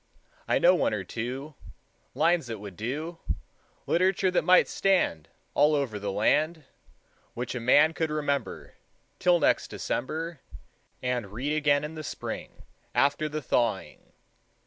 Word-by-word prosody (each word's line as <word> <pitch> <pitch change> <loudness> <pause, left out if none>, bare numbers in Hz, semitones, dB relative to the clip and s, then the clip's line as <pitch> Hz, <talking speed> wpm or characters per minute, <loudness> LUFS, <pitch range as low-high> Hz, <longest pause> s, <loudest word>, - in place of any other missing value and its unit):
I - - +3
know - - +6
one - - +1
or - - -4
two 130 +6 -5 0.6
Lines 165 -2 +2
that 115 -1 -4
would 100 -2 -9
do, 150 - -4 0.7
Literature 185 +1 +2
that 180 - +2
might 185 0 +6
stand 180 - +1 0.3
All 150 +1 +4
over 130 -8 -1
the 100 -1 -3
land, 150 - +1 0.7
Which 120 +1 -4
a 125 - -3
man 145 +7 +5
could 160 -1 -1
remember 145 -2 -2 0.5
Till 180 -1 +4
next - - +2
December, 160 +5 -4 0.6
And 125 -5 -2
read 130 +8 -2
again 145 -1 +2
in 150 +1 -5
the 155 -1 -7
spring, - - -6 0.3
After 145 +2 +2
the 155 0 -4
thawing. 115 -6 -1
145 Hz, 140 wpm, -27 LUFS, 120-160 Hz, 0.7 s, know